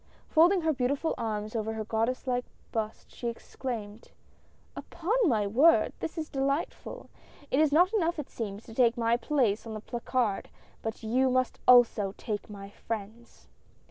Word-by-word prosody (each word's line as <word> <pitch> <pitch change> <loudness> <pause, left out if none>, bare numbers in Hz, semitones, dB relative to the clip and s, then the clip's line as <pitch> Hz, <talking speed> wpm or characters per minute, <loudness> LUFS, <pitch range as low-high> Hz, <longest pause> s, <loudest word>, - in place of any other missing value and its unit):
Folding 350 +4 +5
her 320 -1 +2
beautiful 275 +4 0
arms 215 0 -3
over 220 0 -1
her 220 -1 -4
goddess 225 +4 -1
like 250 -1 -1 0.3
bust, 220 -2 -4
she 240 - -5
exclaimed: 230 -2 -6 0.3
" - - -34
Upon 345 +5 -3
my 220 - +2
word, 275 +11 +4
this 320 - -5
is 315 -1 -3
delightful! 275 - -3 0.4
It 265 - +3
is 310 -2 +4
not 355 +7 +4
enough 345 -5 +1
it 300 - -6
seems, 210 -2 -5
to 225 - -12
take 240 0 +3
my 230 0 +2
place 240 -4 0
on 220 - -5
the - - -4
placard, 235 -1 -2 0.3
but 225 +1 -5
you 255 +4 +2
must 255 0 0
also 225 -5 +5
take 210 -1 -4
my 200 -1 -9
friends 225 +2 -7
240 Hz, 165 wpm, -29 LUFS, 220-280 Hz, 0.4 s, Folding